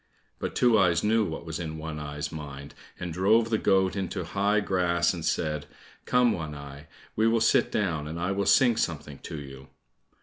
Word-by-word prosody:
But - - -4
Two 120 -3 +4
eyes 85 -3 +3
knew 110 +1 +3
what 80 -1 -6
was 80 -1 -5
in 80 -2 -5
One 80 -1 -6
eye's 75 0 -5
mind, 70 -2 -8 0.3
and 90 -2 -4
drove 110 +6 +3
the 110 - +2
goat 95 -2 +2
into 95 -1 -3
high 100 +4 +1
grass 90 -4 +1
and 85 -3 -6
said, 75 -2 -1 0.4
"Come, 125 -1 +3
One 80 -6 -4
eye, 70 +1 -10 0.3
we 110 +1 +3
will 115 0 +3
sit 110 - +3
down, 85 -8 -1
and 80 +2 -5
I 90 +3 -1
will 100 0 -1
sing 120 -4 +5
something 75 -8 -3
to 80 - -7
you." 65 -1 -10
85 Hz, 195 wpm, -27 LUFS, 75-100 Hz, 0.4 s, sing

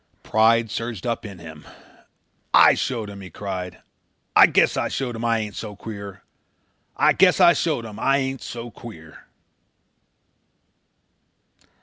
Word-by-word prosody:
Pride 115 0 +2
surged 115 -5 -5
up 115 -2 -3
in 100 -3 -10
him. 80 -3 -12 0.9
"I - - +7
showed 115 -5 -3
him," 100 -1 -10
he 95 - -10
cried. 90 -3 -7 0.5
"I - - +8
guess - - +2
I - - -1
showed 125 -3 -4
him. 115 - -6
I 115 -1 +1
ain't 105 -2 -4
so 105 -2 -7
queer. 100 -2 -9 0.7
I - - +4
guess - - +4
I - - +7
showed 115 - -1
him 110 -1 -9
I 135 +3 +2
ain't 135 -1 -3
so 120 0 -7
queer." 80 -11 -13
110 Hz, 140 wpm, -22 LUFS, 100-115 Hz, 0.9 s, I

